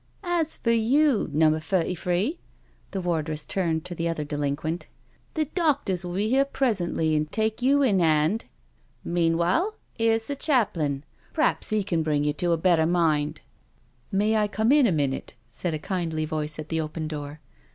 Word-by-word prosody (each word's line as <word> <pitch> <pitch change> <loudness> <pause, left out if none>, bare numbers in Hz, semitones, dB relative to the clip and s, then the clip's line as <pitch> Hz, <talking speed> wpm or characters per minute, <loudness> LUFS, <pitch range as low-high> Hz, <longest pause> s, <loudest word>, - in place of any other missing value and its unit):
" - - -34 0.2
As 320 0 -2
for 230 - 0
you, 245 +3 +3
Number 155 +1 +3
Thirty 170 +3 0
three," 185 - -1 0.5
the 195 - -3
wardress 155 -3 -1
turned 165 -4 -1
to 180 - -5
the 170 0 -2
other 160 -2 -2
delinquent, 145 +3 -3 0.2
" - - -36
the 310 -1 +1
doctors 285 - 0
will 175 0 -5
be 205 +3 +1
here 265 +4 +4
presently 190 - 0
and 150 0 -1
take 220 +1 -1
you 280 +3 +4
in 205 -8 +3
hand. 160 +5 +2 0.6
Meanwhile,, 170 - +1 0.2
here's 225 -1 +1
the 285 - -3
chaplain 175 - +1 0.2
— - - -33
p'raps 310 - +1
he 215 -1 +1
can 170 -4 0
bring 150 -2 +1
you 150 0 +1
to 175 +3 -1
a 165 - +3
better 165 -2 +3
mind." 160 -4 +1 0.4
" 120 - -38
May, 210 +3 +2
I 210 -1 +2
come 220 +4 +1
in 285 -3 +6
a - - +2
minute?" 140 -4 -1
said 160 +7 -2
a - - -1
kindly 160 -2 -2
voice 155 -1 -2
at 155 0 -7
the 160 -1 0
open 155 0 -4
door. 150 -1 -6
175 Hz, 185 wpm, -26 LUFS, 155-220 Hz, 0.6 s, in